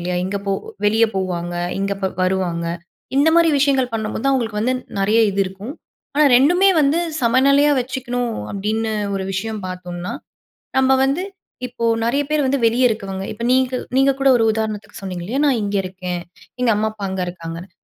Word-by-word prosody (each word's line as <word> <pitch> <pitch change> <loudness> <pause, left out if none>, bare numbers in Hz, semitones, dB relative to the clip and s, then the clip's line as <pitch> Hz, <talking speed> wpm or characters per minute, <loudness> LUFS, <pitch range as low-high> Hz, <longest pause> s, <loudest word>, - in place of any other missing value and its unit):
இல்லையா? 180 +1 -2
இங்க 195 +2 -2
போ - - 0 0.4
வெளிய 220 +2 +4
போவாங்க. 175 -2 -2 0.3
இங்க 195 0 -1
இப்ப 195 -1 -1
வருவாங்க. 185 -2 0 0.5
இந்த 285 +3 +5
மாரி 335 -1 +5
விஷயங்கள் 270 -3 +2
பண்ணும்போது 220 +2 -3
தான் 275 - +3
அவங்களுக்கு 225 -5 -1
வந்து 255 +4 +1 0.3
நெறைய 210 +4 +3
இது 195 0 -1
இருக்கும். 195 +7 -7 0.4
ஆனா 300 - +5
2மே 355 +9 +4
வந்து 290 +3 +3 0.2
சமநிலையா 275 +4 +4
வச்சுக்கணும் 245 -2 -3 0.2
அப்படின்னு 215 +3 -2 0.2
ஒரு 195 - -2
விஷயம் 215 +3 -3
பார்த்தோம்னா, 180 0 -6 0.7
நம்ம 265 0 +4
வந்து 275 +7 0 0.4
இப்போ 240 -1 -4 0.2
நெறைய 245 +5 +1
பேர் 305 -1 +1
வந்து 270 +1 +1
வெளியே 240 +3 +3
இருக்கவங்க. 195 -3 -4
இப்ப 230 +2 -7
நீங்க 260 0 +2 0.2
நீங்க 270 +1 +5
கூட 275 0 +4
ஒரு 225 - +2
உதாரணத்துக்கு 215 -1 -4
சொன்னீங்க 185 -3 -5
இல்லையா? 245 +9 -2
நான் 265 -5 +2
இங்கே 205 0 -1
இருக்கேன். 185 -1 -5 0.4
எங்க 250 - +3
அம்மா 215 +1 0
அப்பா 215 -2 -10
அங்க 190 0 -3
இருக்காங்கன்னு. 170 +1 -7
220 Hz, 170 wpm, -20 LUFS, 190-260 Hz, 0.7 s, இந்த